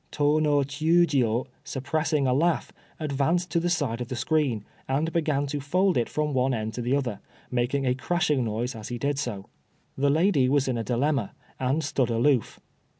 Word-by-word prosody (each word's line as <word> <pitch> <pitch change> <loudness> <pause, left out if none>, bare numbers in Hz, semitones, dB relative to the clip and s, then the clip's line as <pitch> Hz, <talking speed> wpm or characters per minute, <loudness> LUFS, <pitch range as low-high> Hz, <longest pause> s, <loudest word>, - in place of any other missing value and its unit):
Tô 150 +1 +2
no 145 -2 +3
Chiûjiô, 140 -5 +2 0.2
suppressing 150 +2 -1
a 130 - +2
laugh, 165 +5 +1 0.3
advanced 155 +4 0
to 170 - +2
the 175 +1 0
side 140 -9 -1
of 120 - -3
the 130 - -4
screen, 130 -7 0 0.2
and 150 +5 0
began 150 -4 +1
to 145 +1 -3
fold 180 +7 +1
it 120 - +1
from 150 -1 -1
one 130 0 +2
end 110 0 -3
to 120 - -4
the 125 +3 +1
other, 125 -8 -2 0.3
making 125 +3 0
a 125 - +3
crashing 150 0 0
noise 115 +3 -2
as 110 -3 -8
he 120 - -4
did 140 +3 -1
so. 105 -8 -4 0.5
The 140 +1 +2
lady 155 -3 +3
was 140 -1 +2
in 125 -3 0
a - - -2
dilemma, 125 -1 0 0.2
and 135 +5 0
stood 130 -4 0
aloof. 120 +1 +1
140 Hz, 190 wpm, -26 LUFS, 125-150 Hz, 0.5 s, no